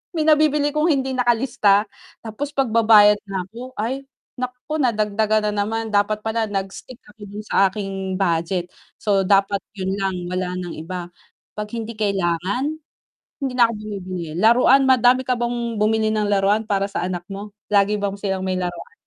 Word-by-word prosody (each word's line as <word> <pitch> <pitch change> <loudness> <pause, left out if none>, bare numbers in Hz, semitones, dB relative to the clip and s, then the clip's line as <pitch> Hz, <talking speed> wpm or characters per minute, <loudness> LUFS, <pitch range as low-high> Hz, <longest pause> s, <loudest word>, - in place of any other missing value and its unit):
may 310 - +1
nabibili 300 -1 +4
kong 305 +2 +2
hindi 265 -2 0
nakalista, 235 -4 +3 0.4
tapos 255 +7 -5
pagbabayad 220 -5 +5
na 190 -2 -3
ako, 240 +5 -9
ay 260 +5 -2 0.4
naku, 250 +5 -4
nadagdagan 215 -3 +1
na - - -5
naman 225 0 -2
dapat 205 +1 +1
pala 220 0 -1
nag-stick 200 +5 -6 0.2
ako 215 - -23
dun 205 +2 -8
sa 195 - +4
aking 195 -2 -4
budget. 175 0 0 0.3
So, 195 -2 +2
dapat 200 0 +3 0.2
yun 190 0 -2
lang 190 -1 -1 0.2
wala 180 0 -2
ng 175 -2 -6
iba, 175 +2 -6 0.5
'pag 210 0 -4
hindi 225 0 -4
kailangan 200 - -1 0.7
hindi 265 - -2
na 235 - +8
ako 230 - -4
bumibili, 185 -6 -6
laruan 250 +5 +5
madami 255 0 +4
ka 250 - +2
bang 235 -1 -2
bumili 220 0 +2
ng 210 -1 0
laruan 200 +2 +3
para 200 -2 0
sa - - -4
anak 180 -1 -4
mo? 200 +1 -7 0.2
Lagi 205 +1 +3
bang 200 -1 -2
silang 190 -2 -3
may 185 - 0
laruan? 175 -2 -5
210 Hz, 165 wpm, -21 LUFS, 195-235 Hz, 0.7 s, na